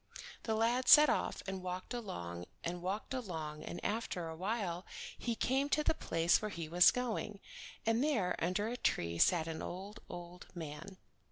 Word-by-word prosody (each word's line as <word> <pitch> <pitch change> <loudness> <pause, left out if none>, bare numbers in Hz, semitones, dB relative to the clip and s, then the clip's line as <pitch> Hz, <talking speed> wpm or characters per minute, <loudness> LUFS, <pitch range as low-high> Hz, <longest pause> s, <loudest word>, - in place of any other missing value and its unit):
The 220 - +1
lad 240 +3 +2
set 300 0 +9
off - - -1
and 190 -1 -4
walked 185 +4 -5
along 90 - -5 0.2
and 175 +1 -3
walked 195 +7 -3
along 160 -11 -4
and 175 - -5
after 205 -6 -2
awhile 180 +1 -2 0.3
he 235 -1 -2
came 270 +5 +1
to 300 +1 +2
the - - +3
place 165 - +2
where 215 - -2
he 170 -5 -5
was 175 +2 +7
going, 225 -4 -2 0.5
and 225 +3 +3
there 220 -12 +1
under 185 +5 0
a 240 +2 -3
tree 85 - 0
sat 170 - +5
an 160 -1 -4
old, 195 +5 -6
old 175 0 -8
man. 165 +3 -7
185 Hz, 170 wpm, -35 LUFS, 170-225 Hz, 0.5 s, set